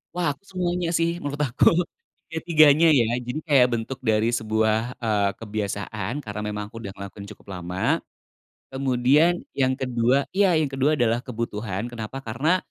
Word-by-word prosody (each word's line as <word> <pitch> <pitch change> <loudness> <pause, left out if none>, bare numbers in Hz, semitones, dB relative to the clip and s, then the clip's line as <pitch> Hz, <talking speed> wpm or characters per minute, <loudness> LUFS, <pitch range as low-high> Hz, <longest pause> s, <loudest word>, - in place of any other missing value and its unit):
Wah 170 -5 0
aku - - -29
semuanya 180 -3 -2
sih 170 +1 0
menurut 145 0 -4
aku 120 0 +4 0.6
ketiganya 160 -1 +5
ya 120 -6 +3
jadi 125 +5 -4
kayak 135 -5 +5
bentuk 125 +4 -6
dari 110 -1 +2
sebuah, 110 +1 0
eee, 105 -4 +1
kebiasaan 105 +1 -4
karena 105 0 -5
memang 105 0 -4
aku 115 +1 -9
udah 100 -3 -7
ngelakuin 100 0 -8
cukup 105 - -14
lama, 90 +2 -1 0.7
kemudian 135 +6 +3 0.2
yang 130 -1 +2
kedua 125 +1 +1
iya 190 -4 +4
yang 155 -3 +1
kedua 135 +3 +1
adalah 120 -1 +1
kebutuhan 110 -4 -4
kenapa 120 +3 -6
karena, 150 +11 +1
125 Hz, 150 wpm, -24 LUFS, 110-150 Hz, 0.7 s, ketiganya